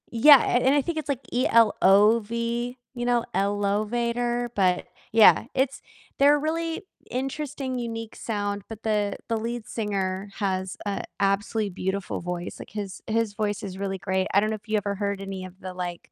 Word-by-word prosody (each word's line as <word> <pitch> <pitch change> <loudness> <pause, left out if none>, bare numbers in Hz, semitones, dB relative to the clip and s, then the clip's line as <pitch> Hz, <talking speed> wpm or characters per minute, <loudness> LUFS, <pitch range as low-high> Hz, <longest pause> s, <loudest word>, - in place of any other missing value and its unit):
Yeah, 275 +5 +9
and 255 +3 +3
I 290 - +4
think 330 +3 -3
it's, 310 -2 -3
like, 275 -3 -1
E-L-O-V, 230 +1 +3 0.2
you 240 0 -3
know, 240 -1 +2
ELOVATOR, 235 +5 0
but, 185 -4 +2 0.3
yeah, 225 0 +7
it's 270 0 0 0.4
they're 285 +1 +7
a - - +1
really 325 +3 -2 0.3
interesting, 270 0 -3
unique 225 -2 -5
sound, 205 -2 -3
but 225 -1 -9
the 210 -2 0
the 230 - +1
lead 230 0 -4
singer 195 -3 -2
has 190 -2 -2
a 200 -1 -2 0.2
absolutely 200 +2 +1
beautiful 190 +1 -3
voice, 175 0 -5
like, - - -10
his 200 -2 -6
his 225 -1 0
voice 205 -1 -2
is 190 -2 -6
really 195 -1 -2
great, 190 0 -1
I 200 - +5
don't 215 - 0
know 220 - -1
if 210 - -25
you 215 - 0
ever 200 -1 -2
heard 200 -1 -2
any 195 -1 -5
of 185 +1 -13
the, 185 0 -6
like, 180 -1 -6
215 Hz, 175 wpm, -26 LUFS, 195-240 Hz, 0.4 s, Yeah